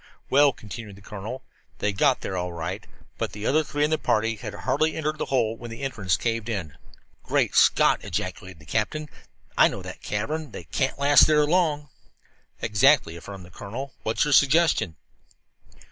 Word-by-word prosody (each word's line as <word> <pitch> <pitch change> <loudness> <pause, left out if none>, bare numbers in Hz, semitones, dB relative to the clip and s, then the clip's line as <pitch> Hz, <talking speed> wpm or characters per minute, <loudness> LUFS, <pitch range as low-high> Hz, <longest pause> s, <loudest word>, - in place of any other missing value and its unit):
"Well," 140 +1 +6
continued 105 -3 -9
the 100 - -16
colonel, 105 +5 -7 0.3
"they 105 - -1
got 130 +6 +2
there 95 - -4
all 90 0 -2
right. 85 -1 -5 0.3
But - - -2
the 105 +1 -6
other 155 +3 +3
three 145 0 -2
in 150 - +1
the 155 - +1
party 115 +1 +1
had - - -6
hardly 155 0 0
entered 155 -1 -2
that - - -1
hole 115 -4 0
when 120 +1 -9
the 115 +4 -8
entrance 100 -10 0
caved 115 -1 -2
in." 90 -10 -4 0.5
"Great - - 0
Scott!" - - +4
ejaculated 95 -2 -5
the 75 - -17
captain. 150 - -2 0.5
"I - - +8
know - - -6
that - - -9
cavern. 145 +7 -3
They - - -7
can't 130 - -2
last 140 +1 +6
there 150 -1 +4
long." 150 -3 +1 0.7
"Exactly," 130 - +3
affirmed 95 +2 -9
the 90 - -16
colonel. 120 +10 -7
"What 110 - -2
is - - +4
your 150 - +1
suggestion?" 140 - +4
115 Hz, 180 wpm, -25 LUFS, 100-145 Hz, 0.7 s, I